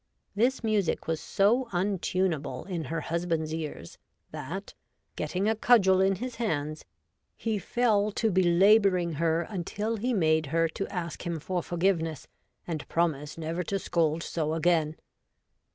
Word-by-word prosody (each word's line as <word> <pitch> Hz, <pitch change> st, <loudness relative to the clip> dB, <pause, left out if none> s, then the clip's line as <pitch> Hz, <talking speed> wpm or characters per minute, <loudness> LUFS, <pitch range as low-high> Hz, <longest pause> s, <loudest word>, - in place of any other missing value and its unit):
This 240 Hz, +5 st, +1 dB
music 215 Hz, -5 st, 0 dB
was 160 Hz, 0 st, -1 dB
so 220 Hz, +6 st, +2 dB
untunable 175 Hz, -7 st, -1 dB
in 175 Hz, -4 st, -4 dB
her 165 Hz, 0 st, -3 dB
Husband's 165 Hz, -2 st, -2 dB
Ears, 155 Hz, -, -6 dB, 0.3 s
that, 155 Hz, +6 st, -6 dB, 0.4 s
getting 190 Hz, +3 st, -1 dB
a 220 Hz, -, +2 dB
cudgel 195 Hz, -5 st, +5 dB
in 195 Hz, 0 st, +3 dB
his 245 Hz, +5 st, -6 dB
hands, 155 Hz, -9 st, -2 dB, 0.5 s
he 220 Hz, -3 st, -2 dB
fell 215 Hz, -1 st, +2 dB
to 225 Hz, 0 st, +1 dB
belabouring 185 Hz, -1 st, +4 dB
her 165 Hz, +1 st, +1 dB
until 210 Hz, +4 st, -3 dB
he 245 Hz, +5 st, -1 dB
made 160 Hz, -, +2 dB
her 165 Hz, +3 st, +2 dB
to 195 Hz, +5 st, -4 dB
ask 170 Hz, -4 st, -5 dB
him 170 Hz, -2 st, -2 dB
for 180 Hz, +4 st, -2 dB
forgiveness, 170 Hz, -4 st, -1 dB, 0.4 s
and 160 Hz, -4 st, -5 dB
promise 155 Hz, -3 st, -1 dB
never 165 Hz, +2 st, -3 dB
to 195 Hz, +3 st, -2 dB
scold 165 Hz, -3 st, 0 dB
so 160 Hz, -1 st, -2 dB
again. 160 Hz, -2 st, +2 dB
175 Hz, 140 wpm, -28 LUFS, 160-200 Hz, 0.5 s, cudgel